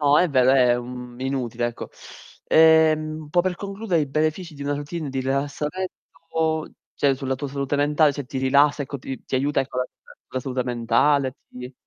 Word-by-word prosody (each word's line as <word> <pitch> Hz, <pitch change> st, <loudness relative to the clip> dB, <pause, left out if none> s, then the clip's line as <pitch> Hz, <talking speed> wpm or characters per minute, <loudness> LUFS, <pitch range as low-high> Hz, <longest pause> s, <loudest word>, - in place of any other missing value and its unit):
no, 145 Hz, 0 st, +5 dB
è 180 Hz, -, +3 dB
vero 130 Hz, -2 st, +4 dB
è, 125 Hz, -2 st, +4 dB
mhmm, 125 Hz, 0 st, -8 dB
inutile 125 Hz, -3 st, -2 dB
ecco. 120 Hz, 0 st, -6 dB, 0.6 s
Ehm, 155 Hz, -1 st, +4 dB
un 150 Hz, -, -12 dB
po' 175 Hz, +2 st, +4 dB
per 185 Hz, 0 st, -1 dB
concludere 200 Hz, -3 st, -2 dB
i 145 Hz, -, 0 dB
benefici 155 Hz, +4 st, -1 dB
di 140 Hz, -, -8 dB
una 145 Hz, 0 st, -1 dB
routine 145 Hz, +2 st, -5 dB
di 135 Hz, -, -3 dB
rilassamento, 155 Hz, +3 st, -3 dB, 0.2 s
cioè 140 Hz, -1 st, +2 dB
sulla 135 Hz, 0 st, -2 dB
tua 140 Hz, +2 st, -5 dB
salute 140 Hz, +1 st, -2 dB
mentale, 150 Hz, +1 st, +3 dB
cioè 145 Hz, 0 st, -5 dB
ti 130 Hz, +2 st, -5 dB
rilassa, 140 Hz, +2 st, +3 dB
ecco 140 Hz, 0 st, -6 dB
ti 130 Hz, +1 st, -7 dB
ti -, -, -5 dB
aiuta 135 Hz, +1 st, +1 dB
ecco 130 Hz, -1 st, -5 dB
la 125 Hz, -, +1 dB, 0.5 s
la 130 Hz, -, -2 dB
salute 125 Hz, 0 st, -2 dB
mentale, 125 Hz, +3 st, +1 dB
ti 125 Hz, +1 st, -9 dB
140 Hz, 185 wpm, -23 LUFS, 130-155 Hz, 0.6 s, no